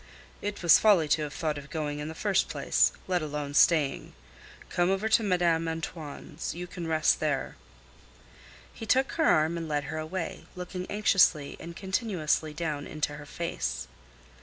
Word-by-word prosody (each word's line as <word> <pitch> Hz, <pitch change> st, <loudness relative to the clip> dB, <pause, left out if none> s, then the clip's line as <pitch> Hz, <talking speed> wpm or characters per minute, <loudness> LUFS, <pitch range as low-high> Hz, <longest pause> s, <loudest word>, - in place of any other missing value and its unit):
"It 205 Hz, -2 st, -4 dB
was 170 Hz, -, +7 dB
folly 195 Hz, -8 st, +5 dB
to 155 Hz, +1 st, +3 dB
have 150 Hz, -1 st, -4 dB
thought 155 Hz, -3 st, -2 dB
of 140 Hz, -, -12 dB
going 150 Hz, -2 st, -3 dB
in 150 Hz, -, -4 dB
the 160 Hz, -, -7 dB
first 200 Hz, +2 st, +1 dB
place, -, -, +2 dB, 0.2 s
let 180 Hz, -2 st, +1 dB
alone 150 Hz, -1 st, -4 dB
staying. 150 Hz, -3 st, +3 dB, 0.5 s
Come 175 Hz, 0 st, +1 dB
over 195 Hz, +3 st, +1 dB
to 220 Hz, -, +5 dB
Madame 175 Hz, -5 st, +2 dB
Antoine's; 160 Hz, -1 st, -5 dB
you 175 Hz, +1 st, -5 dB
can 175 Hz, -1 st, -7 dB
rest 160 Hz, -1 st, +2 dB
there." 145 Hz, -3 st, -1 dB, 1.2 s
He 225 Hz, -, -8 dB
took 265 Hz, +4 st, +3 dB
her 320 Hz, -, +1 dB
arm 160 Hz, -, +3 dB
and 165 Hz, -1 st, -5 dB
led 145 Hz, -1 st, 0 dB
her 155 Hz, -, -4 dB
away, 165 Hz, +2 st, -5 dB
looking 180 Hz, 0 st, -6 dB
anxiously 190 Hz, -8 st, +3 dB
and 170 Hz, +1 st, -8 dB
continuously 190 Hz, -6 st, -1 dB
down 150 Hz, -2 st, -3 dB
into 150 Hz, -1 st, -3 dB
her 145 Hz, -1 st, -10 dB
face. 170 Hz, -, -3 dB
165 Hz, 165 wpm, -28 LUFS, 150-185 Hz, 1.2 s, was